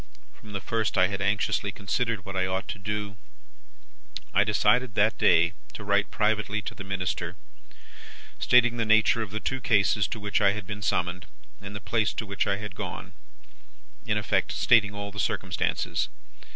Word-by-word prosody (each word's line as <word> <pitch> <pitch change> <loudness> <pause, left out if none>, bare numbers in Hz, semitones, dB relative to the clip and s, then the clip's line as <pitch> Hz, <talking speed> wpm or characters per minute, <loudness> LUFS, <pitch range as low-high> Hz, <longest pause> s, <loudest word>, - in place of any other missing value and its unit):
From 105 - -14
the 100 - -2
first, 110 +1 -1
I 95 0 +4
had 100 0 -4
anxiously 100 0 0
considered 105 +1 -2
what 95 -1 -7
I 95 0 +1
ought 95 0 -2
to 100 - -5
do. 105 -1 -4 1.2
I 100 - +5
decided, 105 +3 +2
that 110 +2 +2
day, 85 +2 +4 0.2
to 105 - -7
write 100 0 +1
privately 105 -1 0
to - - -5
the 100 - -8
Minister, 90 -2 -3 1.0
stating 125 -1 +4
the 115 - +1
nature 110 +1 +4
of 110 - -4
the 105 +2 -4
two 130 +4 -3
cases 105 -2 +3
to 115 - -5
which 105 0 -1
I 100 -1 +4
had 105 -1 -6
been 105 +1 -6
summoned, 90 -3 -1 0.3
and 100 +1 -8
the - - -4
place 110 +1 0
to 110 - -3
which 100 0 -1
I 100 -1 +1
had 105 -2 -7
gone: - - -7 0.9
in - - 0
effect, - - 0
stating 105 -4 +4
all 100 0 -5
the 100 - -8
circumstances. 85 - -1
105 Hz, 180 wpm, -27 LUFS, 100-110 Hz, 1.2 s, I